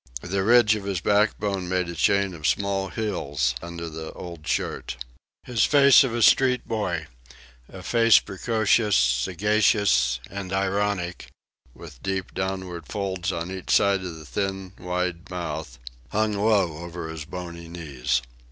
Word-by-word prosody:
The 95 +2 -1
ridge 115 0 +5
of 105 -2 -4
his 100 -3 -1
backbone 100 -1 +1
made 90 -1 0
a 85 - -5
chain 100 +3 +2
of 80 -3 -3
small 100 -1 0
hills 75 - -1
under 85 0 -6
the 80 0 -7
old 85 -3 -9
shirt. - - -2 0.5
His 120 -3 +1
face 140 -2 +7
of 130 - -1
a 120 - +1
street 125 +1 +4
boy 90 -8 -2 0.6
a 95 -1 -10
face 115 +4 +5
precocious, 105 +1 +1
sagacious, 80 - +2
and 100 -2 -6
ironic, 95 -2 -1 0.5
with - - -12
deep 95 -1 -3
downward 95 -3 -4
folds 95 -4 -2
on 85 +2 -4
each 95 -1 -7
side 100 -1 +3
of 90 -3 -6
the 80 - -11
thin, 95 +2 -3
wide 90 0 -3
mouth 80 -8 -5 0.3
hung 110 0 0
low 100 -6 +2
over 85 -1 -6
his 80 -2 -7
bony 85 0 -7
knees. 70 -8 -2
95 Hz, 145 wpm, -25 LUFS, 85-105 Hz, 0.6 s, face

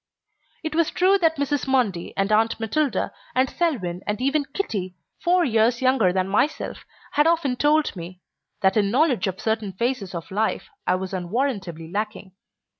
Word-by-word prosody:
It 315 -1 -3
was 330 0 +2
true 385 +2 +3
what 325 -1 +3
Mrs. 285 -1 -1
Mundy 230 -10 +1
and 195 +1 +1
Aunt 225 +2 +3
Matilda 260 +6 0 0.2
and 260 +1 +3
Selwyn 205 - -1
and 210 0 -1
even 280 +3 +1
Kitty, 205 - -3 0.3
four 355 0 +4
years 230 0 +2
younger 255 -8 +3
than 185 0 0
myself, 215 +10 -1 0.3
had 295 +2 +3
often 325 -6 +2
told 295 +1 +2
me, 175 +1 -8 0.4
that 190 0 +3
in 205 -2 +3
knowledge 255 - +2
of 190 0 -4
certain 220 -3 -1
phases 225 -3 -2
of 170 +1 -6
life 215 - -1 0.2
I - - +4
was 190 +1 -4
unwarrantably 185 - -2
lacking. 210 -1 -4
225 Hz, 165 wpm, -24 LUFS, 190-285 Hz, 0.4 s, four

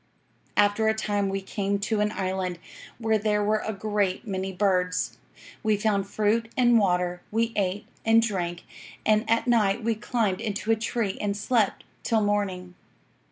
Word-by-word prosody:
"'After 205 +2 +3
a 220 - +3
time 205 -2 0
we 195 0 -2
came 200 +1 -1
to 215 +1 0
an 210 0 +1
island, 185 -2 -2 0.4
where 220 -2 +1
there 210 0 +1
were 215 +1 +1
a 220 - -2
great 205 0 -1
many 190 -2 -3
birds. 180 -1 0 0.4
We 215 -2 +2
found 200 -2 0
fruit 215 +3 0
and 240 -2 +5
water, 180 -2 +1
we 230 +1 0
ate 200 0 -1 0.2
and 225 0 +5
drank, 180 -6 -2 0.4
and 215 +1 +2
at 230 0 +2
night 225 -2 +2
we 230 +1 +2
climbed 215 -3 -1
into 215 0 -2
a - - +5
tree 220 -2 -2
and 205 -1 -1
slept 220 -1 +1 0.2
till 225 -2 +2
morning. 195 -3 -1
205 Hz, 160 wpm, -26 LUFS, 195-220 Hz, 0.4 s, and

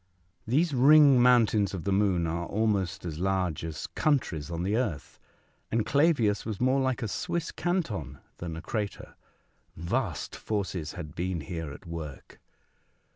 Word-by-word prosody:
These 150 +7 +2
ring 140 0 +7
mountains 110 -5 +4
of 85 - -5
the 100 - -1
moon 95 -3 +2
are 85 +1 -2
almost 100 -5 0
as 80 -2 -5
large 95 -4 0
as 80 -1 -5
countries 120 - 0
on 85 0 -3
the 100 +3 0
earth, 105 - -3 0.5
and 115 -1 0
Clavius 140 -8 +2
was 110 -3 -5
more 130 +2 +3
like 130 -1 0
a - - -1
Swiss 170 - -3
canton 175 - -2 0.2
than 85 -2 -5
a 80 - -8
crater. 105 -3 -4 0.6
Vast 90 - -2
forces 95 -7 -3
had 75 0 -7
been 90 -1 -2
here 80 -2 -5
at 80 - -11
work 80 -4 -8
100 Hz, 150 wpm, -28 LUFS, 85-125 Hz, 0.6 s, ring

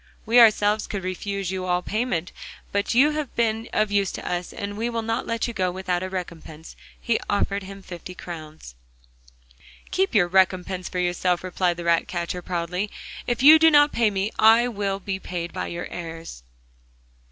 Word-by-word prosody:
We 230 +2 +5
ourselves 215 -2 +4
could 200 -3 -4
refuse 190 +1 -3
you 185 -1 -3
all 180 0 0
payment. 215 -6 -2 0.4
But 200 +3 -1
you 285 +5 +5
have 300 -3 -4
been 225 0 0
of 215 -1 +1
use 200 -1 +1
to - - -6
us, 175 0 -3
and 200 0 -5
we 230 +3 -2
will 230 -1 -3
not 225 +2 -2
let 230 +1 -1
you 235 - -5
go 185 -4 0
without 180 -1 -2
a 185 - -4
recompense,' 165 -4 -7
and - - -22
he 235 - 0
offered 200 0 0
him 195 0 -10
fifty 180 0 -9
crowns. 155 - -9 1.2
'Keep 380 -8 0
your 185 -4 +5
recompense 185 0 +1
for 185 - -5
yourself,' 180 0 0
replied 180 -1 0
the 175 - -5
ratcatcher 170 +1 0
proudly. 180 +3 -3 0.4
'If 240 +1 -1
you 310 +3 +10
do 325 0 +7
not 290 -1 +5
pay 230 -2 +2
me 200 +1 -2
I 225 +2 +6
will 200 -4 -2
be 190 0 -4
paid 175 -2 -5
by - - -3
your 175 0 -5
heirs. 165 - -8
190 Hz, 185 wpm, -24 LUFS, 180-220 Hz, 1.2 s, you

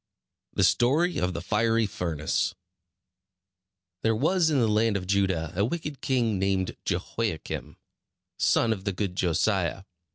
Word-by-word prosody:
THE - - +1
STORY 155 +9 +3
OF 90 0 0
THE 85 0 -5
FIERY 115 +2 +2
FURNACE 85 -6 -1 1.5
There 110 0 +2
was 160 - +2
in 150 - +2
the 120 -3 +3
land 105 0 +2
of 90 - -5
Judah 95 -4 0
a 100 - +2
wicked 150 +3 -3
king 115 -6 +1
named 95 -1 0
Jehoiakim, 90 0 -3 0.6
son 115 -1 +3
of 95 -3 -8
the 100 - 0
good 95 -1 -3
Josiah. 95 +1 0
105 Hz, 135 wpm, -27 LUFS, 90-115 Hz, 1.5 s, STORY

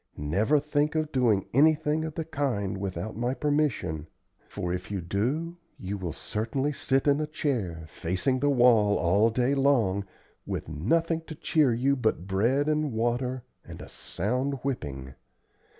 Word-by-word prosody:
Never 100 - +2
think 150 +1 0
of 155 -1 0
doing 115 -7 +2
anything 155 +2 +3
of 160 -1 -6
the 160 - -3
kind 120 -11 -2
without 100 +2 -4
my 120 +3 -1
permission, 145 - 0 0.4
for 90 0 -3
if 90 - -5
you 100 -2 -2
do, 130 - -2 0.2
you 95 +2 -4
will 90 -4 -4
certainly 120 - -2
sit 135 0 0
in 145 +1 +3
a 155 - -2
chair, 115 - -2
facing 95 - -1
the 145 +2 +2
wall, 120 -6 +5
all 100 +6 +3
day 125 +4 +1
long, 125 -9 +2 0.4
with - - -4
nothing 160 - 0
to 160 - -7
cheer 150 -3 +2
you 130 +4 +2
but 110 -9 0
bread 115 +10 +1
and 155 -3 0
water 120 +2 -1 0.2
and - - -10
a - - -9
sound 125 +9 -2
whipping. 70 - -4
125 Hz, 155 wpm, -27 LUFS, 100-145 Hz, 0.4 s, wall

